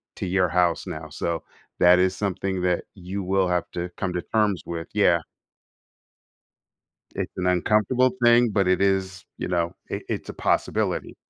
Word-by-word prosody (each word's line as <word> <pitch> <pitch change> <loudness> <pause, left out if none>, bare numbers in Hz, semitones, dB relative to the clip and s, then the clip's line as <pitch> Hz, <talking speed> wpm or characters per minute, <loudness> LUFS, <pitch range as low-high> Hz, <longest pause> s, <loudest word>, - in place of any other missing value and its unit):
to - - -4
your 90 -1 +1
house 90 -1 +1
now, 80 0 -6
so, 85 +3 -3 0.4
that 90 +1 +7
is 95 0 +2
something 95 -1 -2
that 90 -1 +1
you 95 +1 -6
will 95 0 +1
have 90 -1 0
to 90 +1 -4
come 95 -2 -2
to 90 - -2
terms 105 -3 0
with, 85 -1 -5
yeah. 90 -5 +4 1.9
It's - - -3
an 90 0 -1
uncomfortable 105 +8 +2
thing, 120 0 +6
but 100 -2 +1
it 95 +1 +2
is, 95 -2 0
you - - -3
know, 85 -1 0 0.2
it - - -4
it's - - -4
a - - -5
possibility. - - -1
90 Hz, 165 wpm, -24 LUFS, 90-100 Hz, 1.9 s, that